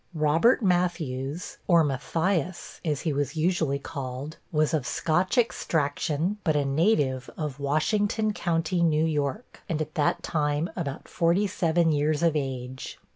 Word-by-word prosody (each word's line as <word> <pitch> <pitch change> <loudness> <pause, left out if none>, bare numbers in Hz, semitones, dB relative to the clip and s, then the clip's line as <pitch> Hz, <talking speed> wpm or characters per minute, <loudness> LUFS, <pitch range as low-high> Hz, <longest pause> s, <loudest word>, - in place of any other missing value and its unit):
Robert 160 - +3
Matthews, 170 -5 -1
or 170 -3 +6
Matthias 165 +5 -1
(as 150 -5 -1
he 160 - -1
was 145 0 -1
usually 160 -3 +1
called), 140 +2 -6
was 155 -1 +1
of 145 -6 0
Scotch 175 - 0
extraction, 160 -3 0
but 155 -4 +1
a 145 -1 +2
native 140 -4 +1
of 150 -3 -4
Washington 205 +9 +1
County, 170 -1 0
New 160 -2 +3
York, 150 - -2
and 160 -3 -1
at 155 0 -4
that 150 -2 +1
time 150 0 0
about 155 -5 -4
forty 170 +5 +2
seven 170 -3 +2
years 150 +1 +1
of 165 -2 +3
age. 130 -2 -4
155 Hz, 140 wpm, -27 LUFS, 145-175 Hz, -, or